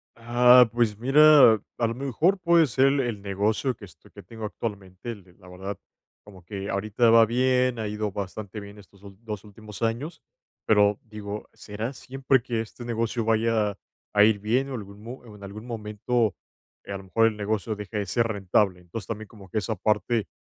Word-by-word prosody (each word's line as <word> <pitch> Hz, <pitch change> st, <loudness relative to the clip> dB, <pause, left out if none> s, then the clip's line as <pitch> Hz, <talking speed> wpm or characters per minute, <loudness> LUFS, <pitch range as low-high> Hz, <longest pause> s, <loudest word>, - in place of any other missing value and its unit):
Ah, 120 Hz, +1 st, +6 dB
pues 115 Hz, -3 st, 0 dB
mira, 140 Hz, -1 st, +7 dB, 0.3 s
a 115 Hz, -, +2 dB
lo 115 Hz, -, -3 dB
mejor 140 Hz, -, +1 dB
puede 170 Hz, -3 st, +4 dB
ser 130 Hz, +2 st, +2 dB
el 140 Hz, +1 st, +3 dB
el 120 Hz, -6 st, -2 dB
negocio 105 Hz, +6 st, 0 dB
que 105 Hz, -, -12 dB
esto 90 Hz, -, -19 dB
que -, -, -12 dB
tengo 110 Hz, +4 st, -8 dB
actualmente 100 Hz, -1 st, -6 dB
el 95 Hz, -5 st, -13 dB
la 90 Hz, -, -17 dB
verdad, 95 Hz, +2 st, -6 dB, 0.5 s
como 95 Hz, -4 st, -15 dB
que 100 Hz, +1 st, -6 dB
ahorita 110 Hz, +4 st, +1 dB
va 115 Hz, 0 st, +7 dB
bien, 125 Hz, +1 st, +1 dB
ha 110 Hz, -, -2 dB
ido 105 Hz, 0 st, -3 dB
bastante 100 Hz, +2 st, -6 dB
bien 100 Hz, 0 st, -11 dB
estos 100 Hz, -1 st, -18 dB
ul 100 Hz, -1 st, -13 dB
2 105 Hz, -3 st, -6 dB
últimos 105 Hz, 0 st, -12 dB
años, 130 Hz, +9 st, -2 dB, 0.5 s
pero 105 Hz, -1 st, +4 dB
digo: 105 Hz, -2 st, -7 dB
"¿Será 110 Hz, +5 st, -6 dB
siempre 135 Hz, -1 st, 0 dB
que 120 Hz, -3 st, -2 dB
este 115 Hz, +2 st, -9 dB
negocio 115 Hz, 0 st, -2 dB
vaya 110 Hz, -2 st, +1 dB, 0.4 s
a 105 Hz, 0 st, +6 dB
ir 110 Hz, -1 st, +4 dB
bien, 125 Hz, +7 st, 0 dB
o 130 Hz, -, -4 dB
algún 100 Hz, -1 st, -9 dB
mo 120 Hz, +2 st, -10 dB
en 105 Hz, -3 st, -13 dB
algún 105 Hz, +3 st, -9 dB
momento, 110 Hz, 0 st, -1 dB, 0.5 s
a -, -, -8 dB
lo 95 Hz, -, -12 dB
mejor 115 Hz, +4 st, +2 dB
el 110 Hz, -, -2 dB
negocio 105 Hz, 0 st, -2 dB
deje 105 Hz, +1 st, -6 dB
de 100 Hz, -, -1 dB
ser 115 Hz, +4 st, +1 dB
rentable?". 100 Hz, -3 st, 0 dB
Entonces, 90 Hz, +5 st, -8 dB
también 110 Hz, -1 st, -5 dB
como 100 Hz, -4 st, -15 dB
que 110 Hz, -, -4 dB
esa 110 Hz, +1 st, -1 dB
parte 105 Hz, +3 st, 0 dB
110 Hz, 190 wpm, -25 LUFS, 100-120 Hz, 0.5 s, mira